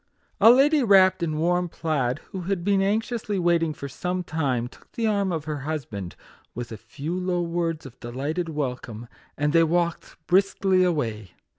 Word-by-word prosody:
A 225 - +8
lady, 280 +5 +5
wrapped 190 -5 +5
in 165 -2 -1
a - - -3
warm 175 +2 +1
plaid, 145 -5 -1
who 190 - -5
had 190 -3 -1
been 200 0 +2
anxiously 215 +1 -1
waiting 170 -2 +2
for 140 -2 -7
some 180 +6 -3
time, 135 -8 -1
took - - -19
the 230 - -1
arm 200 -3 +1
of 160 -3 -3
her 150 -2 -3
husband, 130 - -5 0.4
with 120 0 -6
a - - -5
few 145 - -6
low 180 -1 -1
words 165 -2 -2
of 125 -2 -12
delighted 145 +8 -3
welcome, 125 -6 -4 0.3
and 150 +1 0
they 165 - +6
walked 170 +1 -1
briskly 190 0 +3
away. 115 - -1
165 Hz, 175 wpm, -25 LUFS, 140-185 Hz, 0.4 s, A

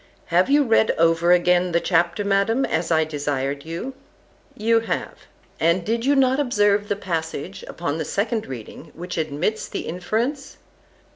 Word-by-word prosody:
Have 180 +6 +4
you 290 +1 +5
read 225 -3 +3
over 165 +1 +3
again 180 0 +3
the 170 - +4
chapter, 175 +3 +1
Madam, 200 +6 +2
as 165 +1 -1
I 160 -1 +3
desired 145 -2 -3
you?—You 230 +2 -4
have: 225 - -3 0.4
And 170 +2 +2
did 230 +2 -1
you 285 +1 +3
not 265 0 +3
observe 205 -6 +2
the 205 - 0
passage, 170 -2 -4
upon 160 -2 -3
the - - -1
second 215 +5 -1
reading, 125 -5 -9
which 180 +2 -6
admits 160 +8 -2
the - - -4
inference? 230 - -3
180 Hz, 150 wpm, -22 LUFS, 165-225 Hz, 0.4 s, you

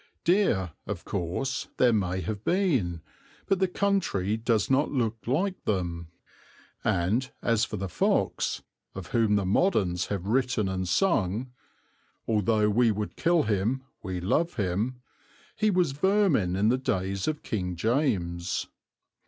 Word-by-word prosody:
Deer, 165 - +2 0.2
of 95 -4 -5
course, 100 +9 -2
there 125 -2 +4
may 95 -3 0
have 105 +4 -4
been; 130 - +1 0.4
but 195 - +1
the 190 - +3
country 180 - 0
does 110 -1 +1
not 135 +3 +2
look 115 -5 0
like 180 +9 0
them; 85 -5 -2 0.8
and 105 +10 +1
as 115 -1 +2
for 110 - -5
the 95 0 -3
fox, 90 - 0 0.3
of - - -7
whom 110 -3 +3
the 100 -2 +1
moderns 95 - +1
have 100 -3 -3
written 120 -2 +1
and 95 -1 -2
sung, 115 - +1 0.8
"Although 105 0 +2
we 120 +2 +4
would 105 0 -2
kill 170 -1 +2
him 110 +5 0 0.2
we 95 -2 -4
love 155 - 0
him," 110 +5 -2 0.5
he 215 0 +2
was 180 -6 +2
vermin 150 - +2
in 105 +3 +2
the 125 +2 +2
days 95 -5 -1
of 155 -1 -2
King 90 -5 -3
James. 90 - 0
110 Hz, 140 wpm, -27 LUFS, 95-135 Hz, 0.8 s, there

